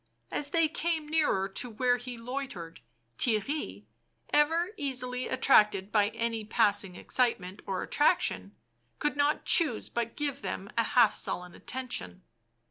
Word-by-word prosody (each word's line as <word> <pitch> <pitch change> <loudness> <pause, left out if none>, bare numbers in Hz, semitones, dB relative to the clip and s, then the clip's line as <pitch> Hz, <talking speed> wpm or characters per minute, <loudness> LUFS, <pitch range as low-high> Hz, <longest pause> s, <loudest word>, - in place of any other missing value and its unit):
As 285 - -3
they 330 +1 +3
came 320 0 -2
nearer 300 -11 +1
to 245 +6 -4
where 245 +2 +1
he 245 0 -8
loitered, 230 - -6 0.4
Theirry, 255 +6 -1 0.5
ever 325 +5 +3
easily 255 - -2
attracted 210 -6 +3
by 205 -1 +3
any 230 0 -3
passing 205 -3 +1
excite 245 +5 +1
ment 185 +2 -10
or 190 -1 -2
attraction, 95 +2 +1 0.4
could 295 - -1
not 290 +1 +1
choose 300 -11 +5
but 235 -1 -3
give 285 -2 -2
them 195 - -5
a 230 - +3
half 240 -3 +4
sullen 180 0 -3
attention. 95 - -5
245 Hz, 135 wpm, -29 LUFS, 205-285 Hz, 0.5 s, choose